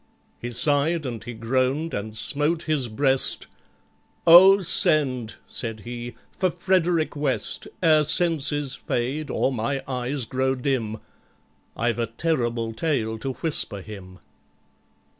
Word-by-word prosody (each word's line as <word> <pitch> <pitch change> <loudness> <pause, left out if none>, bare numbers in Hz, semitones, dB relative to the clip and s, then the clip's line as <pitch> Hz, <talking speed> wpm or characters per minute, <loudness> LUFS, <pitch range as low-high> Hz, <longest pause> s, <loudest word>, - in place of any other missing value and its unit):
He 120 - -5
sighed 145 +6 +1
and 120 -4 -5
he 120 - -7
groaned 130 +7 -1
and 110 +2 -5
smote 150 +8 +1
his 150 -5 0
breast; 135 +4 +2 0.8
"Oh, 190 +4 +8
send," 130 -9 +1
said 115 -2 -4
he, 120 +1 -7 0.2
"for 185 -1 0
FREDERICK 175 -2 0
WEST, 135 -7 -1 0.2
Ere 155 -2 +5
senses 150 -4 +1
fade 135 +6 -3
or 135 - 0
my 130 +4 -2
eyes 130 0 -3
grow 130 +2 -1
dim: 125 -5 -2 0.8
I've 120 +1 -1
a 115 - 0
terrible 120 -3 -2
tale 110 -4 -2
to 135 +2 -4
whisper 125 - -1
him!" 95 -3 -11
130 Hz, 120 wpm, -24 LUFS, 115-155 Hz, 0.8 s, Oh